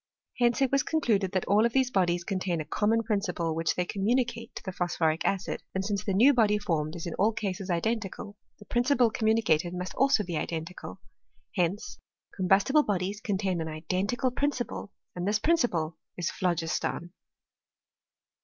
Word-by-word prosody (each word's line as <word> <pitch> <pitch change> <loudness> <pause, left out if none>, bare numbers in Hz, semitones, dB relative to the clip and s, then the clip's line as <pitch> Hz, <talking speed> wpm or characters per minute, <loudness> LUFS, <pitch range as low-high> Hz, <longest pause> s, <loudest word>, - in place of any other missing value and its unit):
Hence 240 +2 +3
it 265 - +1
was 275 -1 +3
con^* 320 - 0
4;luded 200 -9 +1
that 185 - 0
all 205 +2 +4
of 235 0 +1
these 260 -1 +2
bodies 175 -4 +1
contain 185 -3 -1
a 155 - -4
common 225 +5 +1
prin 215 -2 +1
p 200 - -4
ciple 165 -2 -2
which 165 0 0
they 180 - 0
communicate 230 +4 -1
to - - -7
the 190 - -4
phosphoric 175 -3 0
acid; 195 -2 -1
and 190 0 -1
since 200 -2 -1
the 195 - -1
new 255 +8 +6
body 215 -4 +3
formed 165 -6 -1
is 170 - -6
in 170 - -4
all 210 +4 +4
cases 195 -3 -4
identical, 205 +2 -2 0.2
the 210 - -15
principle 245 0 +2
communicated 215 -7 +1
must 180 +1 -4
also 270 -5 +3
be 170 -4 -3
identical. 165 +3 -5 0.6
Hence 175 - -1 0.4
combustible 195 +10 +4
bodies 200 -3 -2
contain 195 -5 -1
an 160 - -3
identical 185 +11 -1
prin 285 +3 +1
ciple, 245 -6 -5 0.3
and 180 +1 -3
this 205 +1 +3
principle 215 - +1 0.2
is 175 -2 -1
phlogiston. 170 0 -2
195 Hz, 175 wpm, -28 LUFS, 175-230 Hz, 0.6 s, new